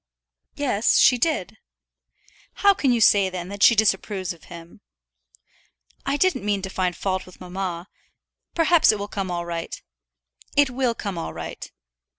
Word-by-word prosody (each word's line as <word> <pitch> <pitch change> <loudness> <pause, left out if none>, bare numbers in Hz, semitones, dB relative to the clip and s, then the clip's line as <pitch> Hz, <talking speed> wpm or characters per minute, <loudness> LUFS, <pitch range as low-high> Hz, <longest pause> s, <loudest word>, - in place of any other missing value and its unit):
"Yes, 245 -7 +1
she 250 -2 +5
did." 320 +5 -1 1.1
"How 400 - +8
can 280 -9 +1
you 240 - +2
say, 200 -3 +5
then, 180 -1 -6
that 200 0 -8
she 235 - +7
disapproves 195 -3 0
of 165 - -19
him?" 170 0 -12 1.3
"I 275 +1 +1
didn't 370 - +1
mean 205 -2 -1
to 190 - -5
find 180 -2 -1
fault 185 0 -3
with 185 - -15
mamma. 180 -1 -5 0.7
Perhaps 330 0 +5
it 215 - -2
will 205 0 -5
come 195 -2 -4
all 175 -1 -3
right." 170 -1 -5 0.8
"It 285 -2 +4
will 250 -2 0
come 200 -6 -5
all - - -5
right." - - -8
200 Hz, 160 wpm, -23 LUFS, 180-245 Hz, 1.3 s, How